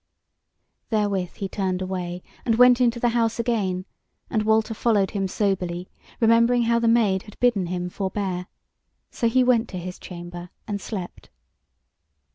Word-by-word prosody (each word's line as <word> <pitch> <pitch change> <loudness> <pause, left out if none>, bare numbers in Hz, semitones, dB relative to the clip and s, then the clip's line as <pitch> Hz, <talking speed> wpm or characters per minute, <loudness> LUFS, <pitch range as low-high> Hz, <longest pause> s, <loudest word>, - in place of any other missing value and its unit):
Therewith 200 -5 0
he 195 - -4
turned 185 -1 -2
away, 180 -1 -4 0.2
and 230 -3 +2
went 250 +1 +6
into 235 -1 +2
the 240 - +2
house 230 -1 +1
again; 205 -6 -1 0.5
and 215 - +1
Walter 220 +1 +2
followed 210 -3 +1
him 195 -2 -1
soberly, 185 -3 -1 0.3
remembering 235 +1 +4
how 235 0 +2
the 235 - +1
Maid 220 -5 +3
had 210 - -15
bidden 225 -7 +2
him 180 0 -3
forbear. 190 -1 -3 0.6
So 230 - +1
he 255 +2 +4
went 245 -2 +3
to 185 - -6
his 180 +1 -6
chamber, 175 0 -8 0.2
and 205 -2 -3
slept. 190 -5 -7
205 Hz, 150 wpm, -24 LUFS, 185-230 Hz, 0.6 s, went